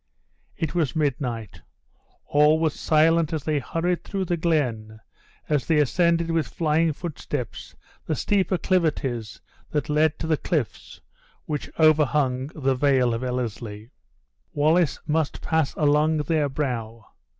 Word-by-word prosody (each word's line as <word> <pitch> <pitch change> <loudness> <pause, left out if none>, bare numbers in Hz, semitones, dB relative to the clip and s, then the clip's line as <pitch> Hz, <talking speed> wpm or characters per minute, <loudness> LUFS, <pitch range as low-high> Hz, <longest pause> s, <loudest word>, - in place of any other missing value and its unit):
It 160 -2 -2
was 170 -4 0
midnight 125 - -2 0.6
all 150 +2 +4
was 160 -2 +1
silent 165 0 +2
as 155 -3 -2
they 150 -2 0
hurried 165 +6 -2
through 195 -1 -3
the 175 - 0
glen, 125 -10 -1 0.5
as 150 -3 0
they 160 - +3
ascended 170 +3 +2
with 165 -1 0
flying 160 0 +1
footsteps 145 - -6 0.3
the 155 - 0
steep 195 +5 +1
acclivities 155 - 0 0.3
that 150 -1 -2
led 155 +1 +2
to - - -5
the 160 -1 +1
cliffs 150 -8 -3 0.4
which 150 -2 -4
overhung 145 -4 +3
the 135 -3 +1
vale 130 -2 +2
of 115 +2 -3
Ellerslie. 115 -3 -4 0.6
Wallace 155 +2 +2
must 155 -1 -1
pass 160 -3 0
along 150 +1 +3
their 150 -1 0
brow. 115 -6 -4
150 Hz, 130 wpm, -24 LUFS, 130-160 Hz, 0.6 s, all